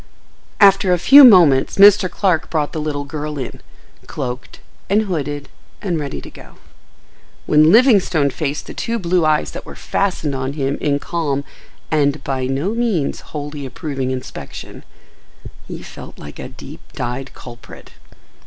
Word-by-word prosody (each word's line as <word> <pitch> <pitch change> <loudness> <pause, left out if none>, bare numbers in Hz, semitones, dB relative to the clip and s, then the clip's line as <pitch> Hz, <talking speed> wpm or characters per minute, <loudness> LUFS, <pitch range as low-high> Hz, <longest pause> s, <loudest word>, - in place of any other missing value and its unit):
After 195 -2 +5
a 180 - +3
few 280 - +8
moments 170 - +6
Mr. 200 -1 +7
Clark 180 -5 0
brought 150 -1 -2
the 155 - -3
little 145 -2 -3
girl 150 0 -5
in, 130 -3 -7 0.5
cloaked 125 -3 -6 0.3
and 210 +3 +3
hooded 145 -7 -4 0.3
and 175 -5 -2
ready 140 -2 -5
to - - -12
go. - - -15 0.9
When 155 +1 +5
Livingstone 200 - +4
faced 150 +1 -4
the - - -9
two 235 0 -3
blue 180 -4 +1
eyes 155 0 +1
that - - -8
were - - -11
fastened 180 -7 -2
on 135 +1 -3
him 140 -1 -2
in 145 -2 +1
calm, 145 -3 -2 0.5
and, 145 -1 +1
by 130 -2 -2
no 140 +9 -1
means, 225 -11 -1
wholly 145 -1 -7
approving 135 0 -4
inspection, 130 -1 -8 0.8
he - - -8
felt - - -11
like 75 0 -11
a - - -7
deep - - -12
dyed 125 +2 -5
culprit. 120 -2 -13
150 Hz, 150 wpm, -18 LUFS, 140-185 Hz, 0.9 s, few